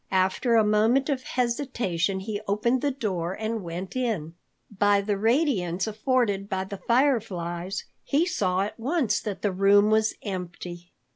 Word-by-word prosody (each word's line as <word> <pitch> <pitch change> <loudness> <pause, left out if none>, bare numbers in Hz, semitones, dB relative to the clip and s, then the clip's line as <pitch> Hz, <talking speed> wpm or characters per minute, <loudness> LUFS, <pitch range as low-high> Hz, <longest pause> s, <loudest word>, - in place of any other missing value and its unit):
After 190 +6 +2
a 225 - +6
moment 225 +7 +3
of 270 -3 0
hesitation, 235 - -1
he 205 +1 -4
opened 235 +5 +1
the 290 - +1
door 190 -10 -2
and 220 +2 -3
went 175 +4 -6
in. 215 -11 -2 0.4
By 205 +1 +4
the 200 +1 -1
radiance 210 - +1
afforded 215 -3 0
by 190 0 -1
the 195 +1 -7
fireflies, 200 -8 0 0.2
he 300 +5 +2
saw 190 - 0
at 210 +3 -4
once 255 -4 +1
that 205 -3 -5
the 205 - +2
room 200 +2 +4
was 220 0 +2
empty. 180 -3 -6
210 Hz, 150 wpm, -26 LUFS, 190-240 Hz, 0.4 s, a